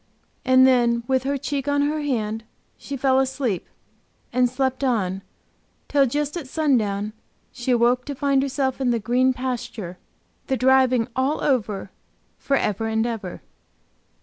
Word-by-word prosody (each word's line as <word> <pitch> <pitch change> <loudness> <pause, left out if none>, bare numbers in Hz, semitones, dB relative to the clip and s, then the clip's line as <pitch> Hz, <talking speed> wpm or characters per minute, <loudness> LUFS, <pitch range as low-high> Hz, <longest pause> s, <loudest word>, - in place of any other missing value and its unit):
And 260 0 +6
then, 240 -2 +3
with 260 +1 0
her 280 +1 0
cheek 280 +1 -3
on 285 0 +2
her 300 +1 0
hand, 225 -6 -2 0.3
she 275 - -6
fell 265 0 +3
asleep, 265 -7 -1 0.7
and 250 0 +3
slept 260 +1 -1
on, 195 -7 0 0.7
till 280 -2 +3
just 290 +4 -2
at 330 -6 -5
sundown 215 -9 0 0.4
she 245 0 -6
awoke 245 +1 +3
to 285 - -5
find 275 0 +2
herself 270 -1 -1
in 255 - +2
the 240 - +2
green 250 +4 +2
pasture, 240 -7 -5 0.5
the 265 - 0
driving 255 -2 +4
all 265 +4 +1
over 210 -8 0 0.5
for 275 - +1
ever 215 0 -1
and 220 0 0
ever. 220 -6 -5
255 Hz, 150 wpm, -23 LUFS, 235-270 Hz, 0.7 s, And